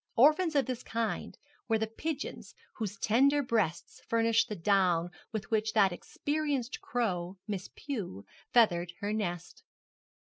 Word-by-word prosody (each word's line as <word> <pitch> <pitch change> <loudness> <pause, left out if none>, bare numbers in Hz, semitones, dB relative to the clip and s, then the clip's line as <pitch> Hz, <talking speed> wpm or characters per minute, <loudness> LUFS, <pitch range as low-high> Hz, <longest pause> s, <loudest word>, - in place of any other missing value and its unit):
Orphans 310 +6 +5
of 280 - +4
this 255 -3 -3
kind 230 -1 -3 0.3
were 225 - +3
the 220 - 0
pigeons 295 +8 -5 0.2
whose 210 -3 -4
tender 275 +8 +3
breasts 220 -10 -1
furnished 230 0 +3
the 210 - -3
down 175 -2 +2 0.2
with 215 -2 -5
which 215 -1 +1
that 200 -4 +5
experienced 285 - -2
crow, 190 -6 -2
Miss 200 -3 -4
Pew, 200 - -5 0.3
feathered 175 -7 +4
her 205 +1 -1
nest. 175 -5 -3
220 Hz, 135 wpm, -31 LUFS, 190-250 Hz, 0.3 s, Orphans